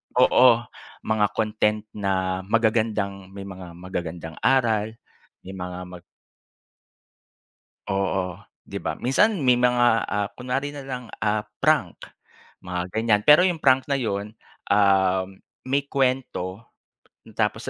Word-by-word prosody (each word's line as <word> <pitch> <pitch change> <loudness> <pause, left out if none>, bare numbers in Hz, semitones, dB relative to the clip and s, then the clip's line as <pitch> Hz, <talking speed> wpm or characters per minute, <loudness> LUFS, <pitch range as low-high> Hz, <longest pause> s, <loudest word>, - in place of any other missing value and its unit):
oo 125 -1 +5 0.4
mga 110 -1 +2
content 105 -1 0
na 95 -2 -1
magagandang 110 -4 0
may 100 - -7
mga 95 -3 -10
magagandang 85 -2 -6
aral 115 -4 +2 0.5
may 95 - -9
mga 90 -1 -6
mag 90 -1 -11 1.9
Oo 95 -2 -1 0.2
'di - - -7
ba. 80 -1 -3
Minsan 175 - +2
may 125 -2 +4
mga 120 -2 +3
ah, 105 -1 -1
kunwari 135 +3 -2
nalang 135 -4 -7
ah, 105 0 0 0.2
prank, - - +1 0.6
mga 90 0 -3
ganyan. 110 -2 +2
Pero 150 +4 +8
yung 180 -3 +1
prank 130 -1 +3
na 140 - +2
yun, 105 -3 -3 0.4
um, 95 -2 +3 0.4
may 140 +2 +1
kwento 125 -7 -1 0.7
tapos - - -1
105 Hz, 115 wpm, -24 LUFS, 95-125 Hz, 1.9 s, Pero